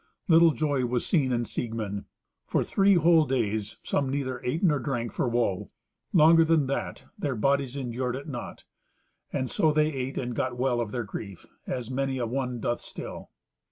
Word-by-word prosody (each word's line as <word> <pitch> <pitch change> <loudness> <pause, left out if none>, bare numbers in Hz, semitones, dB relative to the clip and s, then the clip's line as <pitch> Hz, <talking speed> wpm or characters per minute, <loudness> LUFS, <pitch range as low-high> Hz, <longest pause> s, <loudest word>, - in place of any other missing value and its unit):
Little 165 0 +7
joy 145 -5 0
was 120 0 -1
seen 140 -8 +2
in 120 -1 0
Siegmund. 110 -3 -4 0.4
For - - 0
three 195 0 +3
whole 165 -1 +5
days 110 -5 -1
some 140 -2 0
neither 130 -2 -2
ate 145 +9 -1
nor 150 -6 +4
drank 120 -2 -2
for - - -1
woe. 115 -6 0 0.4
Longer 165 0 +7
than 160 -3 +3
that 135 +1 -3 0.2
their 140 -4 -1
bodies 135 +3 +1
endured 125 -1 -2
it 140 +3 -7
not. 135 -5 -7 0.7
And 130 - -1
so 155 +4 +2
they 155 0 +2
ate 130 0 -4
and 125 -1 -2
got 130 -1 -2
well 125 -1 +1
of 115 - -3
their 120 0 -2
grief, 100 -2 -8 0.2
as 125 -1 -4
many 135 0 -1
a 120 - -1
one 125 0 -2
doth 120 +1 -1
still. - - -8
130 Hz, 180 wpm, -27 LUFS, 120-145 Hz, 0.7 s, Little